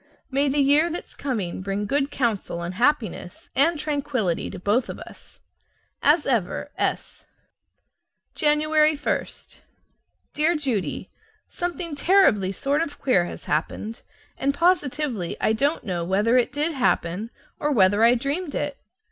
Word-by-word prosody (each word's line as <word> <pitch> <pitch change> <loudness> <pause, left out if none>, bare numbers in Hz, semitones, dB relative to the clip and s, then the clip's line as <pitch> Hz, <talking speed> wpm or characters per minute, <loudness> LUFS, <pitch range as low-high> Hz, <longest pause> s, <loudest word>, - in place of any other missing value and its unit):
May 280 +2 +2
the 275 - -1
year 290 +4 +4
that's 340 - -6
coming 215 -11 -3
bring 195 +2 -2
good 280 +5 0
counsel 220 -10 -2
and 175 +1 -4
happiness 235 - -1
and 320 +4 +3
tranquillity 285 - -1
to - - -8
both 210 +7 0
of - - -5
us! - - -13 0.6
As 295 +2 +4
ever, 240 +2 -1
S. - - -3 1.1
January 305 +1 +3
1. 295 - -1 1.1
Dear 315 +3 +2
Judy: 225 - -2 0.4
Something 345 -2 -4
terribly 290 - +3
sort 280 - 0
of 310 -3 -4
queer 190 -10 +2
has - - -8
happened, 210 +9 -3 0.4
and 275 +1 0
positively 295 - 0
I 215 - +2
don't 280 +7 0
know 180 -6 -2
whether 205 +7 +2
it 250 -2 +3
did 300 +3 0
happen 220 - 0 0.3
or 295 - 0
whether 205 -3 +4
I 235 +2 +6
dreamed 285 +6 -2
it. 290 -1 -3
275 Hz, 140 wpm, -24 LUFS, 205-300 Hz, 1.1 s, I